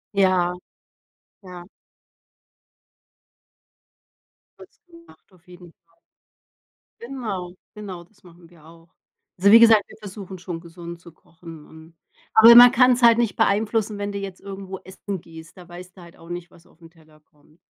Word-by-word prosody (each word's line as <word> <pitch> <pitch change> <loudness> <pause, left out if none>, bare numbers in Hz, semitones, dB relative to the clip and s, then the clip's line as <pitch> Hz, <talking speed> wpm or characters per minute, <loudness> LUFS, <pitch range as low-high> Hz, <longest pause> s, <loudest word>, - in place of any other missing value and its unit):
Ja. 185 -2 +1 0.9
Ja. 180 -2 -12 3.0
Wird's - - -19
gemacht 335 -1 -21
auf 180 -2 -27
jeden 175 -1 -16
Fall. - - -40 1.0
Genau, 215 -8 -7 0.2
genau, 195 -5 -10
das 200 +4 -30
machen 170 -1 -19
wir 165 -3 -22
auch. 165 +1 -19 0.5
Also, 200 +3 +3
wie 230 - +8
gesagt, 225 -2 +6
wir - - -16
versuchen 195 -2 -11
schon, 175 -2 -8
gesund 170 0 -11
zu 170 - -16
kochen 165 -1 -16
und 160 +1 -18 0.4
aber 225 +1 +8
man 245 +1 +9
kann's 250 0 +2
halt 235 -1 +5
nicht 235 -3 -1
beeinflussen, 215 +1 -1
wenn 205 0 -5
du 200 - -6
jetzt 195 -2 -9
irgendwo 195 -1 -9
essen 190 +1 -8
gehst. 165 +2 -15
Da 180 -1 -15
weißt 180 +2 -14
du - - -14
halt 170 0 -17
auch 165 - -18
nicht, 175 0 -8
was 170 - -22
auf'n 165 0 -20
Teller 155 -2 -24
kommt. 150 +1 -30
180 Hz, 150 wpm, -21 LUFS, 170-210 Hz, 3.0 s, man